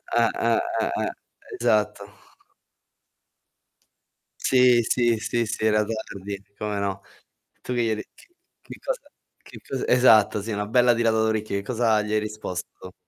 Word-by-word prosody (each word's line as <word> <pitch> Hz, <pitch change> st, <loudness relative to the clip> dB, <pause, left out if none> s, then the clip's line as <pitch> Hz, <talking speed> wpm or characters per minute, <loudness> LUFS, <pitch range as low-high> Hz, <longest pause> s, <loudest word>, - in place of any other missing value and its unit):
Eh, -, -, +4 dB, 0.2 s
eh, -, -, +3 dB, 0.2 s
eh, -, -, 0 dB
eh, -, -, -1 dB, 0.5 s
esatto. 105 Hz, -1 st, 0 dB, 2.2 s
Sì, 125 Hz, -2 st, +4 dB
sì, 120 Hz, 0 st, +2 dB
sì, 120 Hz, +2 st, -1 dB
sì, 110 Hz, 0 st, -3 dB
era 105 Hz, -1 st, +3 dB
tardi. 100 Hz, -2 st, -6 dB, 0.2 s
Come 105 Hz, -1 st, -3 dB
no. 100 Hz, -1 st, -3 dB, 0.6 s
Tu 125 Hz, -, -4 dB
che 120 Hz, -, +1 dB
gli 115 Hz, -, 0 dB
hai 110 Hz, -, +1 dB
det 105 Hz, -, -8 dB
che-che 350 Hz, +1 st, -17 dB
cosa -, -, -3 dB, 0.4 s
che -, -, -13 dB
cosa 135 Hz, -, -3 dB
esatto, 110 Hz, -5 st, +5 dB
sì, 110 Hz, +3 st, -5 dB
una 105 Hz, -1 st, -2 dB
bella 120 Hz, +2 st, +4 dB
tirata 115 Hz, -1 st, +1 dB
d'orecchio. 110 Hz, -1 st, 0 dB
Che 100 Hz, -, -4 dB
cosa 115 Hz, -1 st, +1 dB
gli 105 Hz, 0 st, -4 dB
hai 110 Hz, -, +3 dB
risposto? 105 Hz, -4 st, -7 dB
110 Hz, 150 wpm, -24 LUFS, 105-120 Hz, 2.2 s, esatto